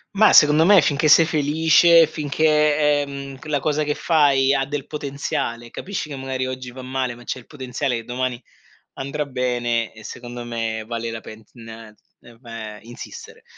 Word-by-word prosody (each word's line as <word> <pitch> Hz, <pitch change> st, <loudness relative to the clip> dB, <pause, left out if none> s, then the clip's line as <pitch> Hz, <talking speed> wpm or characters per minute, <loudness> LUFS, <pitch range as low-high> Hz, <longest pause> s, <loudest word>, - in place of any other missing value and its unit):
Mah, 215 Hz, +2 st, +6 dB
secondo 150 Hz, +1 st, +6 dB
me 195 Hz, +3 st, +7 dB
finché 150 Hz, +2 st, +1 dB
sei 160 Hz, +2 st, +7 dB
felice, 160 Hz, +2 st, +4 dB
finché, 150 Hz, -1 st, +1 dB
ehm, 140 Hz, -1 st, -8 dB
la 145 Hz, -2 st, +1 dB
cosa 155 Hz, +1 st, 0 dB
che 150 Hz, 0 st, -2 dB
fai 140 Hz, -4 st, +3 dB
ha 135 Hz, -, +1 dB
del 140 Hz, 0 st, -5 dB
potenziale, 135 Hz, -5 st, -4 dB
capisci 190 Hz, -4 st, -5 dB
che 145 Hz, -, -7 dB
magari 130 Hz, -1 st, -3 dB
oggi 130 Hz, -1 st, -6 dB
va 130 Hz, +1 st, -10 dB
male 130 Hz, -1 st, -3 dB
ma 120 Hz, -, -14 dB
c'è 130 Hz, -, -5 dB
il 120 Hz, -, -18 dB
potenziale 130 Hz, -2 st, -3 dB
che 115 Hz, -, -5 dB
domani 125 Hz, +1 st, -3 dB, 0.5 s
andrà 145 Hz, +2 st, -4 dB
bene 120 Hz, -3 st, -1 dB
e 110 Hz, -, -14 dB
secondo 120 Hz, +2 st, -8 dB
me 115 Hz, -2 st, -4 dB
vale 115 Hz, -1 st, -4 dB
la 115 Hz, -, -6 dB
pena 115 Hz, 0 st, -12 dB
insistere. 455 Hz, -, -11 dB
135 Hz, 160 wpm, -21 LUFS, 120-150 Hz, 0.5 s, me